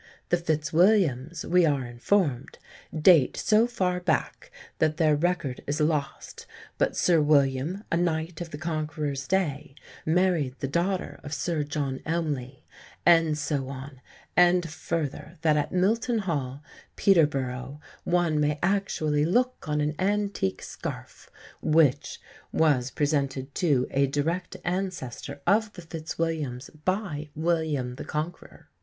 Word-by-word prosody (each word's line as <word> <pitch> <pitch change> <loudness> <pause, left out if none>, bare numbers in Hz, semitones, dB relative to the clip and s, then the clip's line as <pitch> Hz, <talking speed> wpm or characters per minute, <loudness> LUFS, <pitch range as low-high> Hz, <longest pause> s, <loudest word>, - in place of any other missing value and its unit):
"The 175 - +3
Fitzwilliams," 165 - +2
we 180 +1 +4
are 140 -5 +1
informed, 130 +2 0 0.3
"date 155 -3 +5
so 220 +2 +3
far 185 -7 -1
back 165 -5 -1 0.3
that 155 0 +2
their 155 -3 +4
record 165 -4 -1
is 145 +2 -1
lost, 150 -2 -2 0.3
but - - +1
Sir 170 -3 +4
William, 145 +5 +2
a 165 - +2
knight 165 -1 -1
of 170 - -5
the 145 - -7
Conqueror's 150 -4 -3
day, 150 -8 -1 0.3
married 165 -5 +1
the 135 - -3
daughter 175 +6 -1
of 145 0 -5
Sir 165 -2 -1
John 145 -2 -3
Elmley," 145 -6 -3 0.4
and 165 -3 +5
so 140 -3 -2
on; 135 0 -8 0.3
and 175 -1 +5
further, 160 0 -4
that 155 -2 +4
at 150 - 0
Milton 225 +6 +1
Hall, 145 -8 -3 0.3
Peterborough, 140 -6 +1 0.2
one 170 -3 +1
may 150 0 +1
actually 175 -6 +1
look 245 +2 0
on 150 0 +1
an 150 +1 0
antique 200 - 0
scarf - - -7 0.3
which 150 -3 +2 0.3
"was 140 -6 +2
presented 140 -2 -1
to 145 -9 +2
a 140 0 +2
direct 165 +6 -2
ancestor 175 -7 -4
of 215 +1 +3
the 175 - -10
Fitzwilliams 160 -5 -4
by 185 -6 -2
William 155 -6 -1
the - - -6
Conqueror." 155 +3 -5
155 Hz, 130 wpm, -27 LUFS, 140-175 Hz, 0.4 s, date